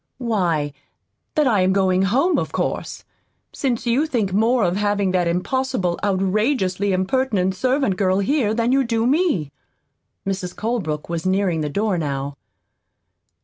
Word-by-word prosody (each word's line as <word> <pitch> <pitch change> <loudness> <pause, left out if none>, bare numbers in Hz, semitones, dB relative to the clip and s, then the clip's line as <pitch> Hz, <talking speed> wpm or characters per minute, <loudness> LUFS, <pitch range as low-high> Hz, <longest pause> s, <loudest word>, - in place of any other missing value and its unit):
"Why, 175 - 0 0.6
that 300 - +3
I 220 -7 +3
am 185 +1 +3
going 190 -1 +2
home, 260 - +2
of - - -4
course - - -3 0.5
since 245 -4 -2
you 250 +7 +2
think 220 -10 -1
more 230 +3 +3
of 175 0 +1
having 205 -1 +1
that 180 -2 +1
impossible, 185 +1 -1
outrageously 200 0 +1
impertinent 190 0 +1
servant 255 -1 0
girl 185 -1 +2
here 215 +2 +1
than 235 +1 +1
you 270 +1 +3
do 230 -2 0
me." 265 - +1 0.7
Mrs. 190 -2 -3
Colebrook 195 -10 -2
was 170 +1 -3
nearing 185 -4 +1
the 150 - -2
door 200 +2 0
how. 140 -2 -3
200 Hz, 145 wpm, -21 LUFS, 185-240 Hz, 0.7 s, that